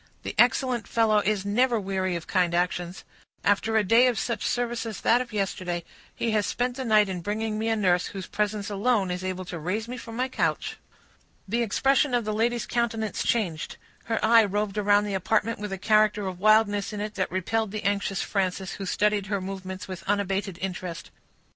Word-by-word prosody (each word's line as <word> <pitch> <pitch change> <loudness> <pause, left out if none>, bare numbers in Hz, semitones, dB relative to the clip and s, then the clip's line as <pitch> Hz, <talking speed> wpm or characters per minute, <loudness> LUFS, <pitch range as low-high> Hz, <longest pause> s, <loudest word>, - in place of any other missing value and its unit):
"The - - -4
excellent 245 -2 +3
fellow 220 -2 +3
is 205 -1 0
never 235 +3 +2
weary 190 -2 -1
of 170 - -5
kind 180 -2 +1
actions. 175 0 -1 0.4
After 220 +2 +2
a 215 - +4
day 230 +6 +5
of 245 -3 +1
such 235 - -2
service 240 -1 -1
as 220 - -6
that 240 +2 +4
of 245 -2 -6
yesterday, 185 -4 -2 0.3
he 230 - -1
has 210 -2 +1
spent 245 0 -1
the 265 - -4
night 215 -2 +4
in 185 -2 -4
bringing 215 +3 -2
me 220 - -1
a 225 - +2
nurse, 180 -4 +2
whose 190 -2 -6
presence 210 -1 -2
alone 205 -2 +1
is 180 +1 -4
able 185 0 -3
to 175 -1 -6
raise 195 +8 -2
me 250 +1 -6
from 230 -2 -8
my 255 +2 0
couch." 260 - -1 0.7
The 230 +5 0
expression 270 +4 +2
of 240 -3 0
the 215 - -1
lady's 235 +2 0
countenance 225 -2 -1
changed; 180 -9 -1 0.3
her 225 -1 -1
eye 230 0 +7
roved 205 0 -1
around 205 0 +4
the 205 -1 -3
apartment 215 +4 0
with 210 -1 -5
a 195 - -3
character 215 0 +3
of 185 -2 -5
wildness 215 0 +3
in 210 - -4
it 210 +1 -4
that 190 -3 -1
repelled 210 +4 -1
the 215 +1 -5
anxious 200 -1 0
Frances, 190 -1 -1
who 195 - -6
studied 210 0 +1
her 200 0 -1
movements 190 -1 -6
with 185 -2 -6
unabated 195 -2 -1
interest. 180 -3 -5
210 Hz, 200 wpm, -26 LUFS, 190-225 Hz, 0.7 s, eye